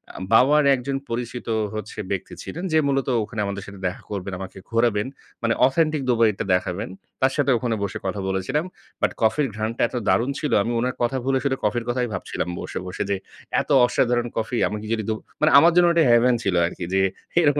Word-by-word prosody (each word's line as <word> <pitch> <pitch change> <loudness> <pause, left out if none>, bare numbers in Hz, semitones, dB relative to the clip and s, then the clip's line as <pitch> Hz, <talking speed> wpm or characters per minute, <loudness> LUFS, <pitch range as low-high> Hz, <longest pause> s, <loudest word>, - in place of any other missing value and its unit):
আ - - -7
বাবার 145 +6 +6
১ 135 - 0
জন 135 -1 0
পরিচিত 120 0 -4 0.3
হচ্ছে 110 0 -6
ব্যক্তি 95 -1 -3
ছিলেন। 175 - -6
যে - - +5
মূলত 135 -1 0 0.2
ওখানে 110 0 -4
আমাদের 100 0 -4
সাথে 100 -1 -10
দেখা 90 - -6
করবেন, 100 -1 -4
আমাকে 95 0 -8
ঘোরাবেন। 115 -2 +1 0.4
মানে 115 -1 +2
অথেন্টিক 155 +1 +1
দুবাইটা 115 -4 +2
দেখাবেন। 90 +1 -1 0.3
তার 130 - +4
সাথে 140 -2 +2
ওখানে 115 -1 -1
বসে 100 - -3
কথা 95 +1 -2
বলেছিলাম। 95 - -1 0.4
বাট - - +2
কফির 115 +6 +2
ঘ্রাণটা 110 +2 -3
এত - - -9
দারুণ 120 +3 +2
ছিল, 150 - -2
আমি 115 - -2
উনার 125 +2 -1
কথা 130 +3 +1
ভুলে 135 0 +2
শুধু 140 -1 +1
কফির 110 +3 0
কথাই 125 0 0
ভাবছিলাম 95 -1 -3
বসে, - - -6
বসে 90 - -3
যে 100 - +2 0.5
এত - - -10 0.2
অসাধারণ 120 -1 +1
কফি 115 +2 -1
আমাকে 105 +1 -5
যদি 110 -1 -1
দো - - +2 0.3
মানে 155 +1 +4
আমার 170 +3 +6
জন্য 175 -1 +6
ঐটা 170 -1 +4
heaven 120 +1 +5
ছিল 95 -4 0
আর 85 - -2
কি - - -5
যে, 95 - +3 0.4
এরকম 145 -2 +3
115 Hz, 205 wpm, -23 LUFS, 105-135 Hz, 0.5 s, বাবার